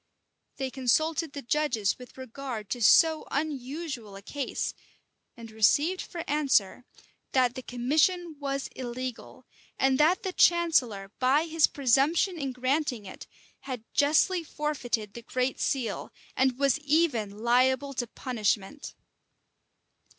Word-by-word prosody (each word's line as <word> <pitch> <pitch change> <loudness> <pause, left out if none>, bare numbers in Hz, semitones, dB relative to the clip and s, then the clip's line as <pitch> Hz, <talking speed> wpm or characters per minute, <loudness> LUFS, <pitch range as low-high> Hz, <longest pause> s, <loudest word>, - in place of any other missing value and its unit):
They 265 -1 -3
consulted 310 +4 0
the 285 - -6
judges 245 -7 0
with 250 +1 -13
regard 260 -4 -7
to 245 - -2
so 315 +9 +5
unusual 275 -5 -4
a 195 - -11
case; 280 +5 -3 0.6
and 230 -1 -10
received 290 - +2
for 340 -2 -6
answer, 260 -6 +1 0.5
that 255 -2 +3
the 260 - -6
commission 310 +8 0
was 275 -1 -3
illegal, 255 0 -6 0.3
and 265 0 +2
that 335 +6 +3
the 375 -2 -3
chancellor, 255 - +2
by 270 +5 +3
his 325 -1 +3
presumption 290 - +2
in 275 -2 -2
granting 255 -2 -1
it, 190 - -10 0.3
had 255 -5 -6
justly 315 +5 +3
forfeited 255 -9 -3
the 235 - -8
great 255 +2 -2
seal, 255 -4 -2 0.2
and 260 -1 +2
was 275 +1 +2
even 285 -9 +1
liable 260 +4 +2
to 245 -2 -3
punishment. 230 +2 -3
265 Hz, 125 wpm, -28 LUFS, 240-300 Hz, 0.6 s, so